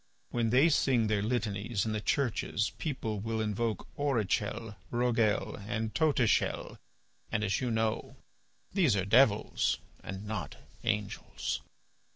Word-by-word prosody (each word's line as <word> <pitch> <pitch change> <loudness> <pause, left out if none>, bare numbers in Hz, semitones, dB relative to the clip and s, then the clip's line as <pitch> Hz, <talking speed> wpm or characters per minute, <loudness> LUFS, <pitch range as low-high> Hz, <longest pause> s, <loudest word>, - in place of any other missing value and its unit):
When 115 -2 +1
they 130 +7 +6
sing 130 -6 +3
their 105 -1 +1
litanies 105 -2 -1
in 110 - -1
the 110 -1 -1
churches 115 -4 0
people 115 -9 -2
will 110 +2 -2
invoke 110 +1 -1
Orichel, 115 -4 -1
Roguel, 115 -4 +1
and 110 -1 -2
Totichel, 145 -8 +1 0.5
and, 110 -2 0
as 95 +3 0
you 125 - 0
know, 115 +4 -1 0.6
these 170 - +4
are 95 -2 0
devils 110 0 +4 0.3
and 95 +2 -6
not 110 0 -4 0.3
angels. 105 -3 -2
110 Hz, 125 wpm, -31 LUFS, 105-125 Hz, 0.6 s, they